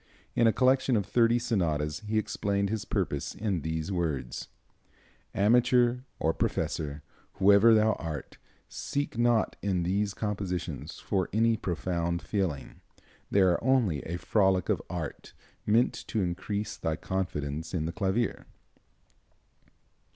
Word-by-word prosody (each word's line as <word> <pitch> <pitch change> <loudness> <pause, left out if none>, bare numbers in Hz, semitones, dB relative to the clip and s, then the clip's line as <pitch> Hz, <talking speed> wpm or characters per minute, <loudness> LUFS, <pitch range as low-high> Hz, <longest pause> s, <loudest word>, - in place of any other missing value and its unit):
In 115 - +4
a - - +6
collection 130 0 +3
of 100 - -1
thirty 115 +2 +3
sonatas 80 -10 -1
he 110 0 -2
explained 100 -1 0
his 110 -2 -2
purpose - - -2
in 100 -6 -1
these 80 +3 -3
words: 80 -9 -2 0.9
"Amateur, 120 +3 +4 0.2
or 80 - +1
professor, 75 -2 -2 0.3
whoever 100 +3 +6
thou 110 0 +4
art, 80 -5 -6 0.3
seek 145 -2 -3
not 120 -1 +2
in 95 -3 0
these 100 +3 0
compositions 100 -4 -4
for 95 -3 -1
any 115 +2 +3
profound 85 -2 -2
feeling. 95 -9 -3 0.5
They 100 - +3
are 90 0 +3
only 120 - +2
a 85 +2 -4
frolic 95 0 +2
of - - +1
art, - - -6 0.3
meant 115 +4 +4
to 110 -4 0
increase 95 +4 -3
thy 80 -1 -1
confidence 80 -4 -3
in 80 -4 -1
the 80 - -2
clavier." 100 +4 -1
100 Hz, 130 wpm, -29 LUFS, 85-110 Hz, 0.9 s, a